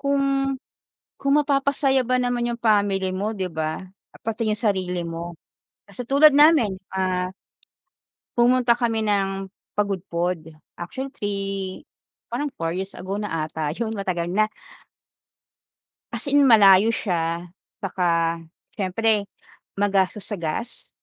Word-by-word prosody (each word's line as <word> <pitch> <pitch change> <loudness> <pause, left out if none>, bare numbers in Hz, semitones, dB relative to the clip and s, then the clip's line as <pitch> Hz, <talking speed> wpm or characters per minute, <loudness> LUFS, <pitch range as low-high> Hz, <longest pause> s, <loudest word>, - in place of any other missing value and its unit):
kung 280 0 +1 1.0
kung 275 0 +1
mapapasaya 275 -2 +2
ba 255 +1 +2
naman 245 -1 0
yung 235 - -7
family 200 -4 +2
mo, 205 +3 -1
'di 190 -4 -3
ba? 160 -1 -3 0.4
Pati 225 0 -2
yung 210 - -4
sarili 185 -4 0
mo. 170 +1 -5 0.5
Kasi 215 +5 -8
tulad 285 +3 +7
namin, 285 - +5 0.2
ah 185 -1 0 1.1
pumunta 240 0 +4
kami 230 -2 0
ng 195 -2 0 0.3
Pagudpud, 180 -4 -1 0.2
actually 265 +11 -6
3, 195 -2 -4 0.5
parang 295 0 -1
4 165 0 -2
years 190 +2 -4
ago 185 +2 -5
na 165 -7 -2
ata 155 -1 -3
yun 225 -1 -2
matagal 185 -5 -2
na. 215 +4 +2 1.6
As - - -6
in 285 +1 +5
malayo 210 -4 +7
siya, 170 -5 -2 0.3
saka 170 -3 0 0.3
siyempre 210 +2 +1 0.6
magastos 200 0 +1
sa 210 - -3
gas, 180 +7 -5
200 Hz, 120 wpm, -23 LUFS, 180-235 Hz, 1.6 s, tulad